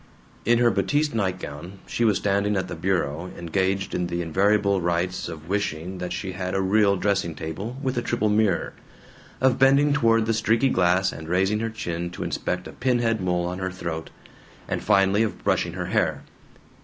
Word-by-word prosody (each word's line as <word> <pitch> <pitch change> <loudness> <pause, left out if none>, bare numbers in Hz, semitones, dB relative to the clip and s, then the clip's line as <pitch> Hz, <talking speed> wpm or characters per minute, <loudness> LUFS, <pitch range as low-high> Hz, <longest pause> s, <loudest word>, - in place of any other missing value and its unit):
In 120 0 +4
her 120 0 +4
batiste 150 +1 +1
nightgown 95 -4 -3
she 120 - -2
was 105 -4 +3
standing 100 +1 +1
at 95 -1 -1
the - - -6
bureau 85 -1 -1
engaged 95 +3 -1
in 90 - -1
the 85 0 -2
invariable 100 +3 +2
rites 85 +1 -1
of 80 -1 -9
wishing 90 -2 -2
that 90 0 -4
she 95 +1 -3
had 95 0 -4
a - - +2
real 100 +1 +3
dressing 95 -4 0
table 100 +10 -5
with 130 -2 0
a - - -2
triple 120 -2 0
mirror, 105 -4 +1 0.7
of 130 -1 +3
bending 140 +2 +5
toward 115 -5 +3
the 115 - +1
streaky 115 +4 +2
glass 90 -1 +2
and 80 0 -9
raising 95 +4 +2
her 115 +1 -1
chin 85 -6 -4
to 90 - -6
inspect 90 0 -3
a - - -8
pin 125 -1 +1
head 115 -3 0
mole 90 -1 0
on 90 +1 -4
her 95 0 -2
throat, 85 -3 -5 0.6
and - - -2
finally 95 +1 +3
of 105 -5 -2
brushing - - +1
her - - -4
hair. - - 0
95 Hz, 190 wpm, -24 LUFS, 90-110 Hz, 0.7 s, bending